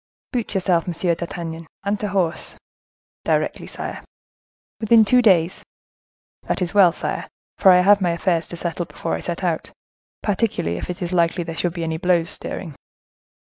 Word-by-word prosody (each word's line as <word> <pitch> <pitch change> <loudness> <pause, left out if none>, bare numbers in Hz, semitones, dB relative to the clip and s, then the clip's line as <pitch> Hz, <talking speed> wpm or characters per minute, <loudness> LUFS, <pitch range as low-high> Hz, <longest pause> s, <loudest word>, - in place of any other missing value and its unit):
"Boot 235 -5 -2
yourself, 180 -3 +1
Monsieur 175 0 0
d'Artagnan, 165 -1 -6 0.2
and 200 +1 -1
to 210 - -1
horse!" 185 -4 -1 0.7
"Directly, - - 0
sire." - - -6 0.8
"Within 220 0 +5
two 250 +4 +5
days." 185 -6 +3 0.8
"That - - 0
is 180 -2 -1
well, 195 -4 +7
sire: - - -3 0.3
for 195 - +6
I 180 -1 +7
have 200 +2 +5
my 180 - +2
affairs 170 -1 0
to 175 - -7
settle 170 0 -3
before 165 - -4
I - - -1
set 175 +2 -4
out; 170 -3 -1 0.5
particularly 195 - 0
if - - -6
it 180 0 -4
is 175 +1 -3
likely 170 0 +2
there 165 -1 -6
should 175 0 -1
be 170 - -3
any 160 -1 -2
blows 175 +1 +1
stirring." 170 -6 -5
175 Hz, 170 wpm, -22 LUFS, 170-195 Hz, 0.8 s, well